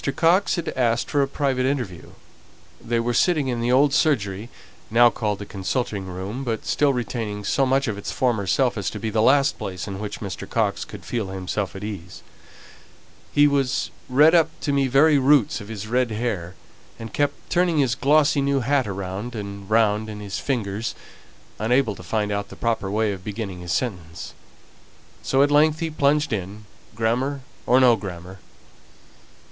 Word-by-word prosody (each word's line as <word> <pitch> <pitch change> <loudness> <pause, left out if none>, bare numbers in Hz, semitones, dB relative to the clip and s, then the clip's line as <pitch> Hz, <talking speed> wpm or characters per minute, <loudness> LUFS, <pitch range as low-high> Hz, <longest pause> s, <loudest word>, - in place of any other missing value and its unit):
Coxe 175 +6 +3
had 170 -2 -3
asked 120 -2 0
for 145 - +2
a 135 - +2
private 135 -2 -1
interview; 125 -11 -4 0.7
they 115 0 0
were 120 +1 -1
sitting 150 -2 +2
in 120 -2 -2
the 120 +1 +1
old 140 +2 +4
surgery, 110 -9 +1 0.4
now 120 +1 +6
called 105 -3 -2
the 100 - -7
consulting 100 0 -3
room, 95 +8 -5
but 115 -4 -3
still 145 -1 +2
retaining 115 -5 -3
so 135 +6 +1
much 135 +1 +2
of 105 -2 -3
its - - -5
former 115 -6 0
self 125 0 +1
as 100 - -1
to - - -7
be 110 +1 -3
the 110 0 +1
last 140 +4 +3
place 90 +1 -5
in 100 -1 -5
which 105 -1 -5
Mr. 100 -3 -6
Coxe - - 0
could - - -11
feel 115 -5 -2
himself 95 0 -4
at 95 - -7
ease. 95 -5 -7 1.1
He 145 - +5
was 140 -2 +1 0.2
red 150 +6 +6
up 165 -2 +5
to 145 - -1
the 140 -1 +2
very 145 +3 +5
roots 135 -4 +3
of 100 - -10
his 110 -2 -6
red 125 +2 +1
hair, 105 -6 -3 0.4
and 115 -1 -9
kept 145 -1 -2
turning 175 -2 +2
his 135 -5 +2
glossy 145 +1 +3
new 140 -1 +1
hat 135 0 +1
round 100 +4 -5
and 100 -2 -7
round 110 -1 +2
in 105 -1 -7
his 100 -1 -5
fingers, 110 -5 -2 0.6
unable 115 +1 +2
to 90 - -11
find 105 +4 -1
out 100 0 -3
the - - -10
proper 115 -4 -1
way 105 +1 +1
of 95 -1 -9
beginning 100 -3 -5
his 90 -1 -6
sentence, 90 -10 -4 0.9
so 135 +1 +3
at 145 - +1
length 155 +1 +4
he 165 -1 -3
plunged 150 -2 +1
in, 100 +1 -5 0.3
grammar 125 +5 0 0.3
or 125 +2 +5
no 125 -3 +6
grammar. 95 -2 -8
115 Hz, 180 wpm, -23 LUFS, 100-135 Hz, 1.1 s, now